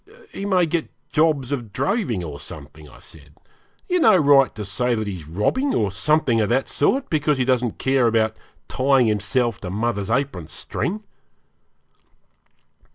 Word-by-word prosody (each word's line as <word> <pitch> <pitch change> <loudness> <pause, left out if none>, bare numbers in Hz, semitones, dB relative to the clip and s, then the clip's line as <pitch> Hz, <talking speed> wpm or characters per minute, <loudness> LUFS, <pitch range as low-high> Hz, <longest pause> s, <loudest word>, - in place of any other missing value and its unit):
'He 200 - -6
may 185 -3 +3
get 165 0 -2 0.2
jobs 150 -4 +1
of 120 -7 -4
droving 175 - -1
or 75 -4 -7
something,' 75 -1 -10
I - - -16
said. 75 -2 -15 0.5
'You 360 - +1
have 220 -7 +6
no - - +6
right 140 -5 +4
to 105 0 -5
say 125 +5 -1
that 110 -1 -2
he's 90 -7 -6
robbing, 105 - 0
or 105 -3 0
something 120 +3 +1
of 105 - 0
that 130 +3 +1
sort, 265 - +1
because 150 -2 +1
he 130 - 0
doesn't 125 -3 0
care 130 -2 +2
about 110 -1 +1 0.3
tying 135 -1 +2
himself 110 +2 0
to 90 - -5
mother's 105 0 -2
apron 120 - -1
string.' 210 +5 -4
125 Hz, 160 wpm, -22 LUFS, 105-150 Hz, 0.5 s, have